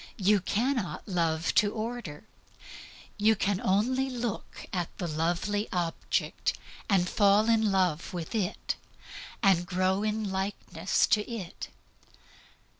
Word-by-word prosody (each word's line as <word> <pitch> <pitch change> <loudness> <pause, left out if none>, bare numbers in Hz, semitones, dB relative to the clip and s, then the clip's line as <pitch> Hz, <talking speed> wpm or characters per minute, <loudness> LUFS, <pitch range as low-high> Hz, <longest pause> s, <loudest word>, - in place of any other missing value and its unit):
You 205 0 +4
cannot 210 - -1
love 165 -3 0
to 205 -1 +4
order. 220 -9 -5 0.9
You 215 +1 +4
can 200 -1 0
only 255 +8 +1
look 240 -4 -4
at 175 -3 -1
the 175 - -3
lovely 175 +7 -1
object, 175 -2 -1 0.3
and 185 -3 +3
fall 205 +2 +4
in 220 -2 +3
love 180 -4 +1
with 175 0 -5
it, 205 -5 -1 0.7
and 180 -3 +4
grow 185 +1 +1
into 215 0 -1
likeness 190 +2 0
to 215 +1 +2
it. 195 -7 -6
200 Hz, 115 wpm, -29 LUFS, 180-215 Hz, 0.9 s, You